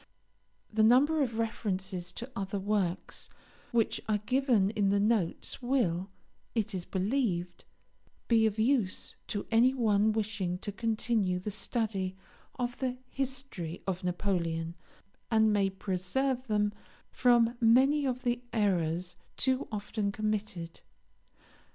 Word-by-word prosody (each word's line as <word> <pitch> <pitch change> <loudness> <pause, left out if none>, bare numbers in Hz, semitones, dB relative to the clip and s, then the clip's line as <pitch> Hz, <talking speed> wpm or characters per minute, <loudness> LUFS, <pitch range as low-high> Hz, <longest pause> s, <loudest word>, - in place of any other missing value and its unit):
The 220 - +3
number 275 +8 +5
of 235 -5 -1
references 190 -5 -2
to 240 +3 -7
other 195 0 -2
works 195 -3 -2 0.4
which 230 -2 +1
are 215 - +3
given 230 -2 +2
in 205 -3 +1
the 200 +1 +3
notes 210 +1 0
will, 210 -8 +1 0.5
it 220 -2 0
is 180 -2 -3
believed, 190 -4 -1 0.6
be 225 -2 +5
of 215 0 -3
use 220 -4 +1
to 205 - -3
any 245 +4 +5
one 215 -3 +3
wishing 210 -4 -1
to 205 +3 -5
continue 220 -2 0
the 185 +4 -4
study 195 -2 -2 0.4
of 245 -1 -3
the 255 -1 -1
history 260 -11 -4
of 185 -1 -2
Napoleon, 170 -3 -1 0.6
and 220 -1 +4
may 200 -1 +3
preserve 210 +8 -1
them 210 -1 +1 0.4
from 240 -1 +4
many 265 +6 +5
of 255 -1 -2
the 245 -1 0
errors 180 -5 0 0.2
too 260 0 +1
often 210 0 -2
committed. 210 -5 -3
215 Hz, 125 wpm, -31 LUFS, 190-240 Hz, 0.6 s, number